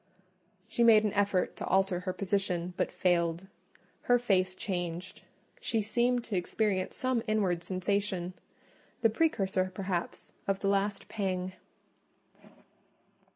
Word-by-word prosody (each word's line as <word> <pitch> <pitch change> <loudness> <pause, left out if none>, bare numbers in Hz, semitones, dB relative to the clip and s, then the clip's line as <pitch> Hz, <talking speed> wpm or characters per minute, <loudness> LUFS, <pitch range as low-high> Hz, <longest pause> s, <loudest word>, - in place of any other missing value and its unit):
She 235 +1 +1
made 220 -2 +7
an 210 - 0
effort 200 -3 +1
to - - -4
alter 190 -1 +2
her 185 +1 -3
position, 185 -2 -1
but - - -1
failed: 170 -1 +1 0.6
her 245 - +7
face 185 -6 +1
changed; 175 -2 -4 0.4
she 235 - 0
seemed 240 +3 +1
to 215 - -4
experience 185 +1 0
some 255 -2 0
inward 190 -6 +1
sensation—the 185 +4 -3
precursor, 195 -9 +1
perhaps, 185 -2 -4
of 195 -1 0
the 195 - +1
last 200 0 0
pang. 185 -3 -2
195 Hz, 115 wpm, -30 LUFS, 180-215 Hz, 0.6 s, made